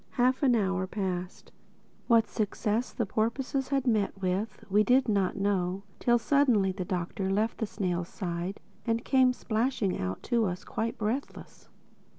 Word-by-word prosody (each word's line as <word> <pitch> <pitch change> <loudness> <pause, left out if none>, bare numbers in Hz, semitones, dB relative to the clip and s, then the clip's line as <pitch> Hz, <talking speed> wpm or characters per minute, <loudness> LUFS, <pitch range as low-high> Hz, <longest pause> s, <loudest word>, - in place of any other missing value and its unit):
Half 255 +1 +2
an 260 -4 +4
hour 190 -3 0
passed. 185 -2 -4 0.6
What 230 -2 +5
success 215 +2 -1
the 235 - -1
porpoises 255 +6 -1
had 270 -1 0
met 210 -5 +1
with, 190 +3 -2
we 210 +1 +4
did 255 +3 +4
not 200 -4 +1
know, 195 -1 0 0.2
till 240 0 +4
suddenly 235 -6 +3
the 185 0 -4
Doctor 185 +1 -2
left 215 +3 0
the 220 - -1
snail's 180 -4 -2
side 180 0 -4 0.2
and 230 0 -1
came 260 -2 +4
splashing 225 -4 -1
out 95 0 -3
to 235 -3 +1
us, 180 -1 -3
quite 225 +1 -3
breathless. 225 +6 -4
210 Hz, 155 wpm, -29 LUFS, 190-240 Hz, 0.6 s, What